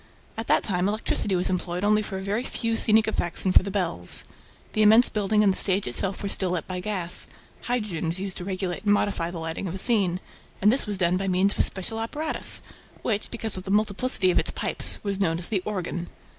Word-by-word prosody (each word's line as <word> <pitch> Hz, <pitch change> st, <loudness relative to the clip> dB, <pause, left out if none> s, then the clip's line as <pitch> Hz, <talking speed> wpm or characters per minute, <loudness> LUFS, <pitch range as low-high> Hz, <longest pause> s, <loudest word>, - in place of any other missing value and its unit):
At 225 Hz, 0 st, -6 dB
that -, -, +3 dB
time, 180 Hz, -2 st, 0 dB
electricity 205 Hz, -2 st, 0 dB
was 180 Hz, -, +2 dB
employed 180 Hz, 0 st, -3 dB
only 210 Hz, +1 st, +3 dB
for 200 Hz, -2 st, -6 dB
a 190 Hz, -, -6 dB
very 205 Hz, +5 st, -2 dB
few 230 Hz, -3 st, -2 dB
scenic 220 Hz, 0 st, +4 dB
effects 175 Hz, -5 st, -1 dB
and 185 Hz, -, +1 dB
for -, -, +7 dB
the 200 Hz, -, -5 dB
bells. 175 Hz, -, 0 dB, 0.5 s
The 215 Hz, -, +1 dB
immense 220 Hz, +3 st, +7 dB
building 210 Hz, 0 st, +1 dB
and 195 Hz, -2 st, +3 dB
the -, -, -6 dB
stage 195 Hz, 0 st, +1 dB
itself 190 Hz, +12 st, -1 dB
were 200 Hz, -, -2 dB
still 190 Hz, -1 st, +2 dB
lit 175 Hz, -2 st, -2 dB
by 185 Hz, -1 st, -5 dB
gas; 180 Hz, -2 st, 0 dB, 0.4 s
hydrogen 210 Hz, -9 st, -2 dB
was 170 Hz, +3 st, -1 dB
used 195 Hz, -1 st, -3 dB
to -, -, -6 dB
regulate 185 Hz, -1 st, -4 dB
and 205 Hz, -1 st, +3 dB
modify 195 Hz, -5 st, -1 dB
the 175 Hz, -, -7 dB
lighting 165 Hz, +3 st, -4 dB
of 175 Hz, -, -5 dB
a -, -, -3 dB
scene; 190 Hz, -4 st, +2 dB, 0.4 s
and 210 Hz, +2 st, +4 dB
this 265 Hz, -, 0 dB
was 205 Hz, -2 st, -3 dB
done 180 Hz, 0 st, +1 dB
by 195 Hz, +1 st, -3 dB
means 190 Hz, +2 st, +2 dB
of -, -, -10 dB
a -, -, +5 dB
special 210 Hz, +4 st, 0 dB
apparatus 295 Hz, +8 st, +1 dB, 0.4 s
which, 215 Hz, -3 st, -1 dB
because 225 Hz, -4 st, -2 dB
of 185 Hz, -, -6 dB
the 190 Hz, -, -8 dB
multiplicity 205 Hz, -1 st, +1 dB
of -, -, +2 dB
its -, -, +2 dB
pipes, -, -, 0 dB
was 200 Hz, -2 st, -3 dB
known 165 Hz, -3 st, +1 dB
as 175 Hz, -, -1 dB
the 200 Hz, -4 st, 0 dB
"organ." 175 Hz, -4 st, -4 dB
195 Hz, 235 wpm, -25 LUFS, 180-215 Hz, 0.5 s, for